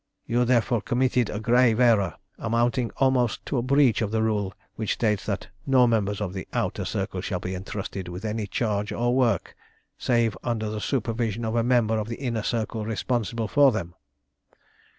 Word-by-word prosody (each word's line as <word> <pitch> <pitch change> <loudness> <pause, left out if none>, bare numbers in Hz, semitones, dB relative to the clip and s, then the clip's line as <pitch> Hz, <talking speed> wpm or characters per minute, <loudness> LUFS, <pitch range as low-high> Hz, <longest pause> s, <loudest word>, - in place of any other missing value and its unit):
You 120 +1 +1
therefore 120 -2 +2
committed 125 -2 +1
a 105 - -3
grave 115 0 +3
error, 110 -9 +4 0.2
amounting 120 +1 +1
almost 130 -4 +1
to 135 - -1
a - - 0
breach 135 -2 +3
of 110 - 0
the 110 +1 0
rule 105 -3 0 0.2
which 110 -2 -1
states 105 -4 0
that 100 -2 -3 0.2
no 130 -2 +5
members 105 -4 +1
of 100 -4 -3
the 95 - -6
Outer - - -1
Circle - - -3
shall - - -3
be 90 - -4
entrusted 95 0 -5
with 90 +4 -7
any 110 -1 -2
charge, 105 -1 -1
or 120 +1 0
work, 120 -8 +1 0.4
save 115 -3 +2
under 110 -3 -2
the 105 -1 -4
supervision 115 -1 -1
of 110 +1 -2
a 115 - +3
member 115 -2 +2
of 105 - -3
the 115 - -4
Inner 120 -5 -2
Circle 110 0 -2
responsible 115 0 -2
for 140 +3 +5
them. 90 -6 -4
115 Hz, 180 wpm, -25 LUFS, 105-120 Hz, 0.4 s, no